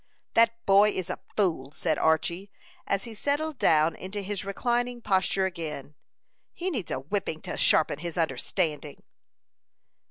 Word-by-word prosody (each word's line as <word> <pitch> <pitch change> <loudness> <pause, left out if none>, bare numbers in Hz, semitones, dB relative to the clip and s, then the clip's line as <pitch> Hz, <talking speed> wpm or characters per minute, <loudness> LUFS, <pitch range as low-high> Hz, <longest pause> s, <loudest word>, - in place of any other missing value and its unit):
"That 230 0 +3
boy 200 +2 +6
is 185 -4 -3
a - - -5 0.2
fool!" 165 -10 +1
said 155 0 -1
Archy, 170 +5 +1 0.4
as 200 - 0
he 230 - -8
settled 285 +5 -1
down 155 +1 +4
into 195 +2 -5
his 200 0 -3
reclining 240 +4 -1
posture 190 -2 +1
again. 155 -6 -5 0.6
"He 370 +2 -3
needs 225 - -3
a 130 - -2
whipping 160 +1 -3
to - - -5
sharpen 150 -2 +3
his 170 +1 -5
understanding." 155 0 -1
190 Hz, 145 wpm, -27 LUFS, 160-220 Hz, 0.6 s, boy